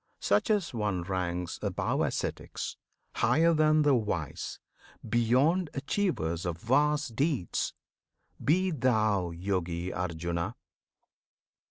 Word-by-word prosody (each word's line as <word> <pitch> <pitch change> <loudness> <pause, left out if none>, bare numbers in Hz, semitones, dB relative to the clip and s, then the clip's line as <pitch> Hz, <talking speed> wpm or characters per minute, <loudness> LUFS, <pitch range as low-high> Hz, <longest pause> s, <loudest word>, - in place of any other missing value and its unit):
Such 100 +1 +2
as 205 -8 +1
one 105 -6 -1
ranks 90 -2 -2
Above - - -1
ascetics, - - -3 0.4
higher 165 +2 +3
than 155 -1 +4
the 145 -1 +4
wise, 105 - -2 0.5
Beyond 130 +10 +3
achievers 135 - -1
of 85 -3 -2
vast 145 - +1
deeds! 135 - 0 0.7
Be 185 +5 +3
thou 110 - +2
Yogi 90 0 -2
Arjuna! 85 +3 -2
110 Hz, 95 wpm, -29 LUFS, -, 0.7 s, than